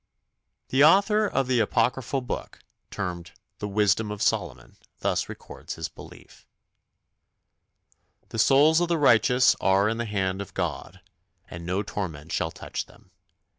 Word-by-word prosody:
The 135 +2 +4
author 205 +6 +5
of 135 -8 0
the 125 -1 +1
Apocryphal 125 +4 0
Book 125 - -6 0.3
termed 85 -1 -5 0.3
The 105 - -4
Wisdom 105 +1 +1
of 105 0 -5
Solomon - - -2 0.2
thus - - -1
records - - -9
his - - -5
belief: - - -15 1.8
The 115 - -5
souls 150 +7 +5
of 175 - +1
the 170 -1 +1
righteous 125 -2 +4
are 95 +2 +3
in 115 +1 -1
the 115 - -2
hand 95 -2 -2
of 100 - -10
God, - - -4 0.5
And 85 0 -8
no 95 +3 -1
torment 80 -7 -6
shall 80 - -1
touch - - -6
them. - - -21
110 Hz, 140 wpm, -25 LUFS, 95-135 Hz, 1.8 s, author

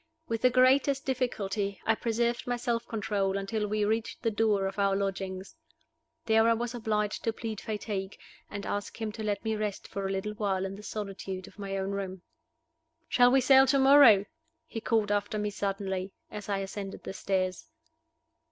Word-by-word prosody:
With 225 -1 -2
the 255 - +6
greatest 265 +2 +4
difficulty 215 -6 -1
I 225 - +4
preserved 235 +2 -1
my 245 0 0
self 235 -1 -2
control 200 -3 -1
until 210 +2 -2
we 210 0 0
reached 220 +3 -2
the 225 - +2
door 210 -2 +2
of 195 +1 -4
our 195 -1 +3
lodgings. 195 -1 -3 0.7
There 225 0 +4
I - - +5
was 240 +1 -3
obliged 210 -3 -1
to 225 - +1
plead 220 -2 -5
fatigue, 205 -2 -4 0.3
and 200 -1 -6
ask 205 +2 -4
him 220 -1 -2
to 220 +1 -7
let 205 0 -2
me 220 0 0
rest 210 -2 -3
for 195 -1 -3
a - - -2
little 195 +2 -2
while 195 -3 -1
in 195 0 -5
the 205 - -10
solitude 195 -3 -5
of - - -17
my 195 -1 -3
own 195 0 -2
room. 190 -2 -4 0.9
"Shall 245 -1 +6
we 265 +1 +5
sail 265 +1 +6
to 275 +1 +4
morrow?" 265 -7 +7 0.4
he 225 - -6
called 220 -2 +1
after 205 +1 0
me 210 0 -1
suddenly, 195 -1 -3 0.2
as 210 0 -7
I 200 - +1
ascended 195 0 -6
the - - -6
stairs. 190 - -1
210 Hz, 185 wpm, -29 LUFS, 195-230 Hz, 0.9 s, morrow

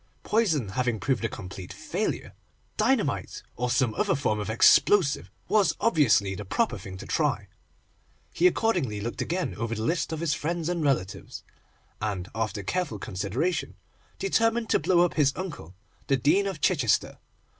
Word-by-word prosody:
Poison 165 - +1
having 120 +1 -1
proved 125 0 0
a 115 - 0
complete 95 -3 -8
failure, - - -3 0.4
dynamite, - - 0
or 125 +1 -1
some 125 -2 +2
other - - +1
form 125 -6 0
of 105 - -4
explosive, 140 - +4 0.2
was 210 -3 +3
obviously 125 - +3
the 105 - -6
proper 220 - 0
thing 95 0 -8
to - - -9
try. - - 0 0.9
He 175 - +4
accordingly 170 - 0
looked 115 +3 -4
again 180 +2 -2
over 115 +1 -3
the 110 - -3
list 165 +6 0
of 160 - -3
his 165 -3 +1
friends 165 +3 -2
and 170 -2 -1
relatives, 120 -10 -2 0.6
and, 100 -4 -3
after 110 -2 -2
careful 180 - -2
consideration, 125 - -2 0.4
determined 225 +3 +1
to - - +4
blow 175 -2 +3
up 175 - -2
his 140 -3 +3
uncle, 150 - -7 0.3
the 135 - +3
Dean 185 +10 +3
of 185 -7 -5
Chichester. - - +1
135 Hz, 155 wpm, -27 LUFS, 105-175 Hz, 0.9 s, explosive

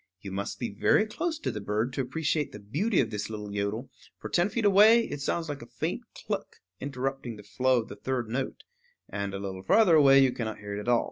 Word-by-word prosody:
You 100 -1 -8
must 100 +1 -3
be 120 - -3
very 105 - +3
close 320 +9 -2
to 315 - -3
the 105 - -5
bird 105 +5 -1
to 135 - -1
appreciate 150 +3 -1
the - - -8
beauty 160 - 0
of 115 -3 -2
this 105 0 -3
little 105 -2 -6
yodel; 105 +5 -2 0.3
for - - -7
ten 175 +3 +2
feet 230 0 -1
away 215 +4 +6
it 145 - -5
sounds 165 +4 -1
like 145 -2 -5
a 120 - -10
faint - - -3
cluck - - -4 0.2
interrupting 135 -3 -3
the 105 - -12
flow 130 +1 +1
of - - -16
the - - -8
third 130 -3 -2
note; 130 +4 -3 0.4
and 100 -1 -4
a - - -4
little 95 -1 -5
farther 185 - +5
away 140 -3 +7
you 130 - +3
cannot 110 -3 -4
hear 100 0 -7
it - - -3
at 105 - -7
all. 120 -1 +5
125 Hz, 235 wpm, -28 LUFS, 105-155 Hz, 0.4 s, away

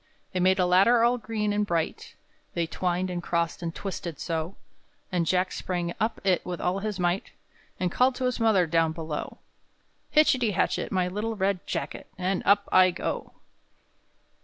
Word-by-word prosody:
They 185 - 0
made 185 +1 +4
a 180 - +3
ladder 195 +7 +5
all 245 +1 +3
green 215 -2 -2
and 210 0 +1
bright, 170 -5 -2 0.4
They 170 - +1
twined 180 +2 -1
and 175 -1 -3
crossed 170 -1 -1
and 170 - -2
twisted 175 -5 -5
so; 165 +2 -3 0.6
And 175 -3 0
Jack 185 +1 +1
sprang 175 -2 -3
up 220 +2 0
it 190 -2 +2
with 180 -1 -5
all 180 +2 0
his 210 -1 -4
might, 175 +2 -1 0.5
And 180 -1 0
called 255 +4 +3
to 260 - -4
his 250 -1 0
mother 220 -5 +4
down 165 0 +2
below: 160 -2 -5 0.8
"_Hitchity 255 -8 +4
hatchet, - - 0
my 185 -2 +1
little 210 +5 -3
red 195 -2 -1
jacket, - - -4
And 185 +1 -1
up 200 0 +4
I 185 0 +7
go! 180 - -4
185 Hz, 170 wpm, -27 LUFS, 175-210 Hz, 0.8 s, I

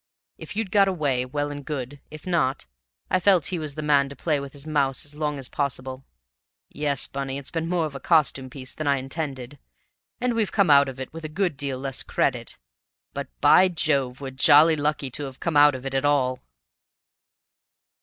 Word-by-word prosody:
If - - -8
you'd 215 -3 -2
got 200 -1 +5
away, 145 -9 0
well 145 +2 -2
and 145 0 -7
good; 140 -1 -5
if 155 0 -11
not, 155 - 0 0.5
I 185 - +3
felt 185 -4 +4
he 175 - -1
was 150 -3 -5
the 155 - -4
man 140 -2 +3
to 140 - -9
play 150 +1 0
with 140 -1 -7
his 140 0 -10
mouse 140 -4 0
as 145 - -7
long 150 -1 -2
as 135 -2 -6
possible. 130 -1 -3 0.7
Yes, 145 -2 -1
Bunny, 135 0 -4
it's 140 -1 -8
been 165 0 -2
more 175 -2 +1
of 150 - -6
a 135 - -6
costume 140 -5 +2
piece 130 -1 -8
than 155 - -5
I 140 -1 +3
intended, 135 -1 -5 0.6
and 250 -1 0
we've 225 -3 0
come 200 -7 +3
out 140 -1 +6
of 130 0 -9
it 130 - -7
with 165 0 -8
a 155 - -5
good 175 0 -1
deal 135 -1 -3
less 135 0 -4
credit. - - -1 0.6
But, - - -4
by 185 - +7
Jove, 140 -7 -1
we're 135 -1 -5
jolly 150 +4 +6
lucky 145 -2 -1
to 145 +3 -3
have 135 -1 -9
come 170 -3 -2
out 145 -1 +6
of 130 +1 -8
it 135 - -4
at 135 0 0
all!" 130 -3 +2
145 Hz, 205 wpm, -24 LUFS, 135-155 Hz, 0.7 s, by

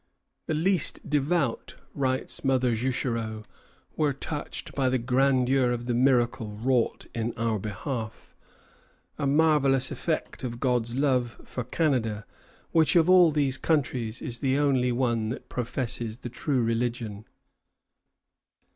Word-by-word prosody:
"The 155 - 0
least 180 +4 0
devout," 145 -2 0 0.2
writes 130 -2 -1
Mother 130 -3 +2
Juchereau, 115 -2 -2 0.5
"were 150 -2 +1
touched 145 +2 -5
by 135 -2 +1
the 130 - +2
grandeur 130 +1 +2
of 120 0 -3
the 120 - -1
miracle 120 -4 +1
wrought 120 +1 0
in 115 0 -2
our 115 -2 0
behalf, 110 +3 -5 0.8
a 140 - 0
marvellous 140 -3 +3
effect 160 -4 -3
of 120 -2 -4
God's 120 -2 0
love 130 -4 +1
for 125 - -5
Canada, 115 -6 0 0.5
which, 160 0 +3
of 170 +1 +5
all 180 -2 +7
these 140 -3 0
countries, 125 -7 -1
is 120 -1 -5
the 135 -1 +1
only 135 -4 +2
one 120 -3 0
that 125 - -6
professes 120 -2 -3
the 120 - -7
true 125 +1 -1
religion." 115 -2 -2
125 Hz, 130 wpm, -27 LUFS, 115-140 Hz, 0.8 s, all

